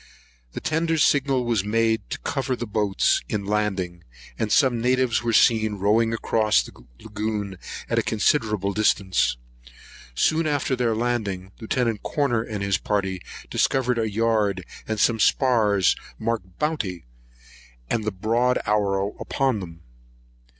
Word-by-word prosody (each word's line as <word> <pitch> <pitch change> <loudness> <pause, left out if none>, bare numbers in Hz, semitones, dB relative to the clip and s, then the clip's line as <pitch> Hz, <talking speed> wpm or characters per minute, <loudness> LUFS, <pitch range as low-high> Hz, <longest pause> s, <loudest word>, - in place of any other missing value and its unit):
The - - -4
tender's 160 0 +1
signal 135 -3 +2
was 115 -5 +1
made 110 +1 0
to - - -3
cover 130 -2 -2
the 120 - -5
boats 105 -2 +1
in 100 -2 -2
landing; 95 -4 -2 0.4
and 110 -2 -1
some 130 -5 +3
natives 125 -1 +2
were 120 -1 -1
seen 110 -1 +4
rowing 110 +3 +2
across 110 -1 +2
the - - -11 0.3
lagoon 105 -3 -4 0.3
to - - +1
a - - +3
considerable 105 -3 +1
distance. 95 -7 +1 0.8
Soon 160 - +2
after 145 -3 0
their 120 -3 0
landing, 105 -6 -2
Lieut. 115 -1 -1
Corner 135 -6 0
and 110 -3 -5
his 100 -2 +1
party 95 -3 -1 0.3
discovered 125 -2 +1
a 110 -1 0
yard 105 -4 0 0.2
and 110 -1 -2
some 115 0 +3
spars 105 -6 +3 0.2
marked 110 -6 -3
Bounty, 110 - -2 0.8
and 110 - -1
the 110 - -1
broad 115 +6 +1
arrow 100 -1 0
upon 135 -5 0
them. 85 -3 -9
110 Hz, 135 wpm, -24 LUFS, 100-120 Hz, 0.8 s, seen